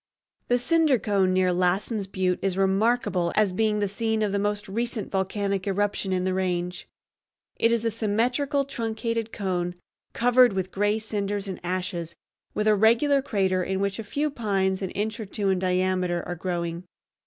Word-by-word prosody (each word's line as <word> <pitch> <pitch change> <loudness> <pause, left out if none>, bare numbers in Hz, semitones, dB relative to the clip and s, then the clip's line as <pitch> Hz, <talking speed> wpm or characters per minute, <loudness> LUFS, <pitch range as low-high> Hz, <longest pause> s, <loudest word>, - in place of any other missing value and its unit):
The 245 - +3
Cinder 310 +1 +3
Cone 195 -3 +1
near 185 -1 +2
Lassen's 190 +4 0
Butte 185 -1 0
is 190 -1 -1
remarkable 195 -2 +2
as 210 -3 +3
being 215 +2 +1
the 205 -1 +1
scene 220 +2 -1
of 205 - 0
the 200 - 0
most 205 +1 -1
recent 230 +2 -3
volcanic 195 0 -1
eruption 200 0 0
in 185 -1 0
the 185 0 0
range. 180 -1 -2 0.7
It 230 - +3
is 230 -1 +1
a 230 - +2
symmetrical 245 +7 0
truncated 230 -3 -3
cone 180 -3 -2 0.4
covered 245 -1 +5
with 190 -1 -2
gray 205 +2 +1
cinders 205 -2 -2
and 190 - -5
ashes, 175 -2 -3 0.4
with 210 - 0
a 215 - +6
regular 235 +7 +4
crater 190 -8 0
in 190 +1 -2
which 200 +2 -1
a - - -3
few 290 +8 -1
pines 195 -6 0
an 190 - -2
inch 215 +4 -3
or 220 - -5
two 200 0 -1
in 190 -1 +2
diameter 185 -1 0
are 175 - -2
growing. 170 0 -3
200 Hz, 175 wpm, -26 LUFS, 185-225 Hz, 0.7 s, a